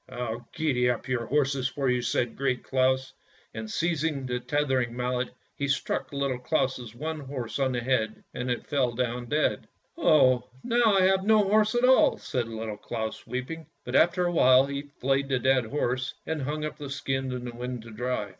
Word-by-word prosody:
" - - -44
" - - -24
I'll 120 -2 -5
gee 130 -6 +1
up 120 -2 -2
your 125 -3 -1
horses 135 -2 +1
for 135 0 -2
you," 125 -1 +2
said 120 -1 -1
Great 130 -2 -1
Claus, 130 0 +1 0.4
and 110 0 -6
seizing 160 -1 -1
the 125 -1 -2
tethering 130 -2 0
mallet 125 0 -1 0.3
he 140 - -2
struck 140 0 -1
Little 140 -3 -1
Claus' 125 -4 -1
one 155 +4 -4
horse 130 -3 -5
on 130 -1 +1
the 120 - -1
head, 115 -3 0
and 125 0 -3
it 120 - -2
fell 130 -5 +1
down 120 0 -2
dead. 150 +4 0 0.2
" - - -45
Oh, 130 - +4
now 235 -3 +3
I - - +5
have 190 0 +3
no 215 0 +5
horse 215 +3 +3
at 240 +1 +4
all," 260 +1 +5
said 125 -3 -2
Little 110 -2 -5
Claus, 110 +1 -5
weeping. 155 +6 -5 0.2
But 125 - -3
after 175 +3 +4
a 175 - +1
while 130 -5 +6
he 140 +1 -5
flayed 135 +1 +1
the 130 - +2
dead 130 -1 +2
horse, 130 0 -1
and 160 -2 -2
hung 150 +3 -2
up 155 - -5
the 145 -2 -7
skin 135 -1 -2
in 125 -1 -4
the 120 - -6
wind 125 -1 -5
to 115 - -11
dry. 120 -2 -2
130 Hz, 205 wpm, -27 LUFS, 125-150 Hz, 0.4 s, while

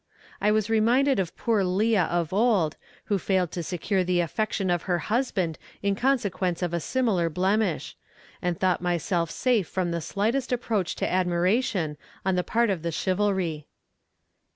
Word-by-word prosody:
I 205 - +3
was 215 -1 +2
reminded 235 +4 +3
of 180 -3 -3
poor 225 -4 +1
Leah 195 +1 +2
of 170 -1 -1
old 200 -7 +2 0.3
who 200 -2 0
failed 185 -3 0
to 175 - -3
secure 185 +3 -1
the 180 0 +1
affection 195 +2 -1
of 175 -1 +1
her 175 - +3
husband 190 - -1 0.2
in 200 0 +2
consequence 200 -8 0
of 175 -1 -1
a 170 - +1
similar 195 -4 +1
blemish, 190 +1 0 0.5
and 175 -2 -1
thought 185 -2 +1
myself 175 -1 0
safe 230 -6 +1
from 180 -2 -2
the 170 0 -2
slightest 230 - -1
approach 220 -7 -1
to - - -1
admiration 180 - +1 0.3
on 190 - +2
the 180 0 +1
part 230 +1 +1
of 180 -4 -2
the 170 +1 -2
chivalry. 185 -4 -1
190 Hz, 160 wpm, -26 LUFS, 175-215 Hz, 0.5 s, I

